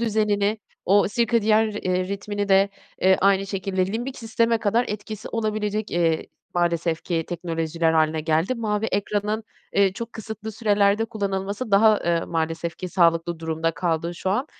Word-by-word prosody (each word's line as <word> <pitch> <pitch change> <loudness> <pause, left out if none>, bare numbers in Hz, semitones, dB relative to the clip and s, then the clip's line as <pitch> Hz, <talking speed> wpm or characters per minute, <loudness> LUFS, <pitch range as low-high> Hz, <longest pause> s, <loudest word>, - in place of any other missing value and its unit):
düzenini, 210 -2 +1 0.3
o 200 +1 +4
sirkadiyen 220 -1 +2
ri 210 - -4
eee, 185 0 -1
ritmini 205 +1 -3
de 195 +1 +5 0.5
aynı 195 0 +3
şekilde, 190 -1 -1
limbik 240 +6 -4
sisteme 230 0 +1
kadar 225 +4 +2
etkisi 215 +1 -6
olabilecek, 215 -1 -2
eee, 165 -2 +1 0.3
maalesef 170 -1 0
ki 165 -2 -1
teknolojiler 165 -1 -1
hâline 155 0 +2
geldi. 160 +8 +1
Mavi 215 -2 -1
ekranın, 210 +2 -1 0.3
eee, 195 -1 +3
çok 230 +4 -7
kısıtlı 220 0 -7
sürelerde 205 -1 +2
kullanılması 200 +1 -3
daha, 210 +1 +5
eee, 170 -1 +2
maalesef 165 0 -2
ki 185 - -5
sağlıklı 170 -2 +2
durumda 160 0 -1
kaldı 170 0 -2
şu 185 - -2
an. 250 +9 0
200 Hz, 150 wpm, -24 LUFS, 170-215 Hz, 0.5 s, de